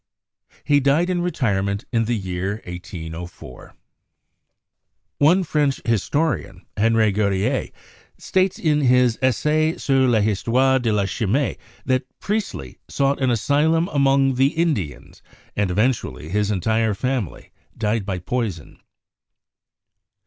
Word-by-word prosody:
He 145 -1 +3
died 145 +6 +2
in 175 -1 0
retirement 100 - -1
in 115 -2 +1
the 120 - 0
n6 100 - -6
CHEMISTRY 95 - -5
year 90 +2 -2 0.2
1804. 85 -5 -9 1.4
One 175 +6 +4
French 150 -4 0
historian, 115 - -1
Henri 110 0 +3
Gautier, 100 -1 0 0.5
states 190 0 0
in 150 -2 +1
his 125 -3 +3
"Essai 150 +5 +1
sur 135 -2 +2
l'histoire 120 +4 +2
de 120 -3 0
la 105 -2 +1
Chimie" 115 +7 0 0.3
that 130 0 0
Priestley 210 0 -4
"sought 140 0 0
an 130 - +2
asylum 150 +8 +2
among 135 -2 +3
the 130 +2 +3
Indians, 140 - -2 0.3
and 100 -2 0
eventually 105 - 0
he - - -8
and 95 - -4
his 105 -1 +1
entire 110 +2 +1
family 125 - -3 0.3
died 110 0 0
by 95 -1 -3
poison 95 - -4
120 Hz, 125 wpm, -22 LUFS, 100-140 Hz, 1.4 s, One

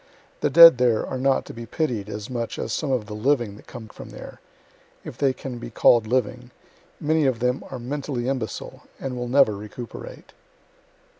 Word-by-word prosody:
The - - +1
dead 165 -6 +9
there 120 -3 +2
are 130 - -5
not 135 0 +1
to - - -9
be 115 0 -8
pitied 120 - -2
as 105 -1 -6
much 120 -2 -4
as 110 - -3
some 150 -3 -2
of 125 -5 0
the 105 - -8
living 120 -2 0
that - - -16
come 120 -3 -9
from - - -12
there - - -11 0.6
if - - -8
they 140 -2 +2
can 130 -2 -7
be - - -7
call' 120 +1 +5
d 110 - -11
living 125 0 -1 0.5
many 155 -1 +2
of 130 -3 +1
them 125 +2 -1
are 130 - -6
mentally 130 0 -4
imbecile, 125 -7 -4 0.2
and 135 -2 -4
will 125 0 -4
never 125 -4 +4
recuperate. 115 - -9
125 Hz, 195 wpm, -24 LUFS, 115-135 Hz, 0.6 s, dead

